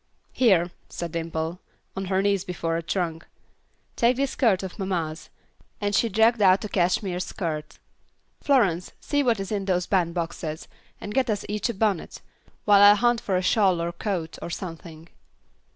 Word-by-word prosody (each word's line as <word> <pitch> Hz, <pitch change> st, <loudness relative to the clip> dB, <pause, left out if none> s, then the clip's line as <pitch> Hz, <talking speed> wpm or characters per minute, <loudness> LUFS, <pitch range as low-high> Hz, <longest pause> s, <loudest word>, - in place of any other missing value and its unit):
"Here," 185 Hz, -8 st, +3 dB, 0.2 s
said 170 Hz, -1 st, -5 dB
Dimple, 165 Hz, +1 st, -3 dB, 0.4 s
on 195 Hz, 0 st, -3 dB
her 190 Hz, +1 st, 0 dB
knees 200 Hz, -2 st, +1 dB
before 170 Hz, -3 st, -3 dB
a 165 Hz, -, -1 dB
trunk, 165 Hz, -2 st, -3 dB, 0.7 s
"take 240 Hz, +1 st, +3 dB
this 275 Hz, 0 st, 0 dB
skirt 205 Hz, -8 st, +2 dB
of 190 Hz, +2 st, -7 dB
mamma's," 170 Hz, -5 st, -3 dB, 0.5 s
and 205 Hz, -1 st, -1 dB
she 230 Hz, +3 st, +2 dB
dragged 220 Hz, +2 st, +3 dB
out 190 Hz, +1 st, +5 dB
a -, -, -5 dB
cashmere 180 Hz, 0 st, 0 dB
skirt. 165 Hz, -4 st, -4 dB, 0.6 s
"Florence, 195 Hz, -, +2 dB
see 290 Hz, -1 st, 0 dB
what 235 Hz, -6 st, +1 dB
is 195 Hz, +1 st, -5 dB
in 200 Hz, -2 st, -2 dB
those 180 Hz, -2 st, 0 dB
band 175 Hz, -3 st, 0 dB
boxes, 165 Hz, -2 st, -4 dB, 0.3 s
and 205 Hz, -, -6 dB
get 260 Hz, 0 st, +1 dB
us 210 Hz, -2 st, -1 dB
each 210 Hz, +3 st, -2 dB
a -, -, -1 dB
bonnet, 200 Hz, -3 st, -1 dB, 0.5 s
while 205 Hz, -1 st, +6 dB
I 205 Hz, 0 st, +9 dB
hunt 240 Hz, +2 st, +2 dB
for 190 Hz, -5 st, 0 dB
a 185 Hz, -, -1 dB
shawl 190 Hz, -3 st, +3 dB
or 170 Hz, +1 st, -2 dB
coat, 170 Hz, -3 st, -4 dB
or -, -, -5 dB
something." 165 Hz, -2 st, -8 dB
190 Hz, 170 wpm, -25 LUFS, 170-210 Hz, 0.7 s, I